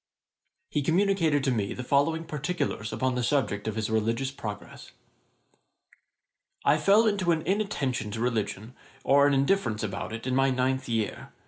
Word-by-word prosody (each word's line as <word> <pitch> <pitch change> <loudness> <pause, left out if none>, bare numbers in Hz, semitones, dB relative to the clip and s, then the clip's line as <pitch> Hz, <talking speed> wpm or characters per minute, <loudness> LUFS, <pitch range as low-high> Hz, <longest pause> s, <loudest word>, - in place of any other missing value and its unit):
] 375 - -53
He 145 - 0
communicated 165 -2 +2
to 135 - +1
me 105 -5 -1
the 125 - -5
following 145 +5 +1
particulars 150 -7 -3
upon 130 +4 0
the 125 - -1
subject 115 -5 0
of 110 - -2
his 110 -1 -1
religious 115 +5 0
progress. 105 -6 -8 1.7
'I 150 - +5
fell 200 +8 +5
into 200 -5 +1
an 160 -1 0
inattention 165 - -1
to 110 +2 -5
religion, 115 -1 -2 0.3
or 140 +1 +5
an 145 - +2
indifference 135 - +1
about 100 -1 -4
it, 115 +1 -6
in 130 - -1
my 135 +1 +3
ninth 130 0 0
year. 115 -2 -2
135 Hz, 160 wpm, -27 LUFS, 115-160 Hz, 1.7 s, I